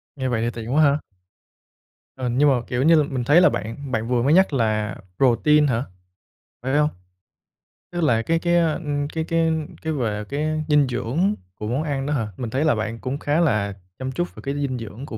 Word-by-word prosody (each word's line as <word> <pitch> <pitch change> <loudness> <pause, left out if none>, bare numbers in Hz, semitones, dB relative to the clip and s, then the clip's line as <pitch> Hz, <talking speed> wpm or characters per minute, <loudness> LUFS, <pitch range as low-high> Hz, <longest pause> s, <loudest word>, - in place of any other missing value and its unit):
Nghe 130 -2 -2
vậy 115 -2 0
thì 120 - 0
tiện 115 +2 -5
quá 155 +1 +5
ha. 145 +1 +4 1.2
Ờ, 125 -2 -2
nhưng 140 +4 +3
mà, 125 -3 +2
kiểu 125 +2 -1
như, 165 +2 +6
l 155 - +4
mình 130 -3 -3
thấy 150 +8 +5
là 190 - +6
bạn 115 +6 -5
bạn 110 0 -1
vừa 120 -1 +1
mới 145 +4 +3
nhắc 190 -4 +4
là 110 -4 0 0.2
protein 145 +4 +4
hả, 120 0 0 0.8
phải 130 +3 0
hông? 150 0 +3 1.0
Tức 175 0 -3
là 115 -6 +3
cái 165 +7 0
cái, 175 0 +1
ơ, 165 -2 +3
ưm, 145 -3 -2
cái 160 +1 -3
cái 165 0 +1 0.3
cái 160 0 -2
về 105 -6 -2
cái 155 +2 -1
dinh 145 -2 +4
dưỡng 140 - 0 0.2
của 105 - -6
món 130 +7 -1
ăn 140 -3 -2
đó 150 - -1
hả? 115 -6 -1
Mình 120 -3 -4
thấy 135 +6 0
là 155 - +3
bạn 110 +1 -3
cũng 130 +2 -3
khá 145 +3 +1
là 105 -11 +1 0.3
chăm 130 0 -3
chút 175 +6 -3
về - - -10
cái 140 - -1
dinh 140 -3 -2
dưỡng 115 +4 -8
của 110 - -7
135 Hz, 225 wpm, -23 LUFS, 120-155 Hz, 1.2 s, như